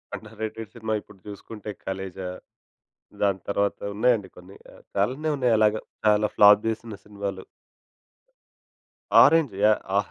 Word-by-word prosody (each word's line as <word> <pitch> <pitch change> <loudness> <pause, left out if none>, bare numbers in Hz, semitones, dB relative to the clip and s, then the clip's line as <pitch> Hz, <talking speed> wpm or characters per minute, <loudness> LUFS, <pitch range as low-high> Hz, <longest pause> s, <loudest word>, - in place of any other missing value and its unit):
Under - - -12
rated 110 -1 -5
cinema 110 -1 -3
ఇప్పుడు 95 - -19
చూసుకుంటే 105 +1 -9 0.2
ఖలేజా. 95 -1 -5 1.0
దాని 100 -2 +1
తర్వాత 100 0 0 0.2
ఉన్నాయండి 110 -2 +1
కొన్ని. 90 +2 -14 0.4
చాలానే 130 +10 0
ఉన్నాయి 125 -4 +2
అలాగే 110 0 +3 0.3
చాలా 105 0 +4
ఫ్లాప్ 105 0 +7
చేసిన 115 0 -4
సినిమాలు. 100 -2 -6 1.8
ఆరెంజ్. 160 -9 +4
యాహ్! 100 -1 +1
105 Hz, 115 wpm, -25 LUFS, 100-110 Hz, 1.8 s, ఫ్లాప్